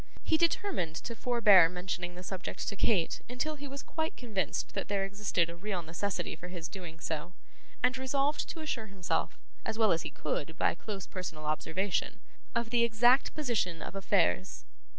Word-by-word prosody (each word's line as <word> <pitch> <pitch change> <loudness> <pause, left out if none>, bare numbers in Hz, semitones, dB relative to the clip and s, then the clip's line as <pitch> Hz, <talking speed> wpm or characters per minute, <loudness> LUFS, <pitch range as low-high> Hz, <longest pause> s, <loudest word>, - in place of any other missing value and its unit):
He 320 - +3
determined 335 - +1
to 230 +7 -5
forbear 210 -8 +6
mentioning 180 0 -3
the 180 - -8
subject 185 0 -4
to 200 - -1
Kate 195 -5 +2
until 305 +5 -2
he 285 -1 -7
was 275 +1 -6
quite 320 -1 -2
convinced 205 - -2
that - - -2
there 200 -1 +1
existed 195 -4 +1
a 170 - -7
real 185 0 -3
necessity 170 +4 -2
for 175 +3 -8
his 175 -2 -5
doing 170 -3 -8
so; 160 +2 -3 0.5
and 250 +1 +4
resolved 275 +3 0
to 325 - -5
assure 235 -8 -3
himself, 180 -5 -1 0.3
as 220 0 -3
well 220 -2 +5
as 165 - +2
he - - -4
could 155 +1 -3
by - - +3
close 195 +1 -5
personal 165 -5 -6
observation, 175 +5 -1 0.4
of 235 -1 0
the 240 -1 +4
exact 240 +3 +4
position 225 - 0
of - - -6
affairs. 195 -1 +1
195 Hz, 175 wpm, -32 LUFS, 175-240 Hz, 0.5 s, forbear